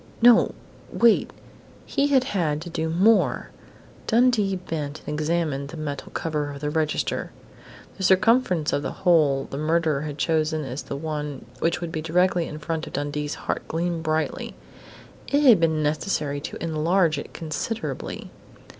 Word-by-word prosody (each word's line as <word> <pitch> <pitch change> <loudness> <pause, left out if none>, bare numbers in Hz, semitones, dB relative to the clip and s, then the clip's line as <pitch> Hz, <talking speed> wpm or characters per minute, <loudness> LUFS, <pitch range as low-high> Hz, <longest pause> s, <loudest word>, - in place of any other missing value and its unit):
No, 240 0 +6 0.4
wait! 235 -1 +4 0.6
He 280 - +1
had 270 -3 +4
had 170 - -1
to 170 - -8
do 160 0 -2
more! 200 +7 +3 0.6
Dundee 225 -4 +3
bent 155 -5 -5
and - - -6
examined 150 -2 -1
the 165 - -8
metal 145 -3 -5
cover 150 -3 -2
of 140 -1 -7
the 150 0 -2
register. 155 -1 -1 0.7
The - - -8
circumference 190 -4 +3
of 145 - +1
the - - -3
hole 150 -6 +4
the 140 - -4
murderer 155 -2 +1
had 150 -1 -5
chosen 155 0 0
as 130 +2 -5
the - - -6
one 150 -2 -4
which 170 +1 0
would 170 -1 -4
be 160 - -3
directly 175 +1 +2
in 150 - -7
front 160 +1 -4
of - - -10
Dundee's 145 +1 -2
heart - - -2
gleamed 170 0 -2
brightly. 155 0 -2 0.7
It 285 +1 +2
had 240 -9 +7
been 160 -2 +2
necessary 150 -2 -1
to - - -6
enlarge 165 0 +2
it - - -8
considerably. 165 +8 -4
160 Hz, 155 wpm, -24 LUFS, 150-180 Hz, 0.7 s, had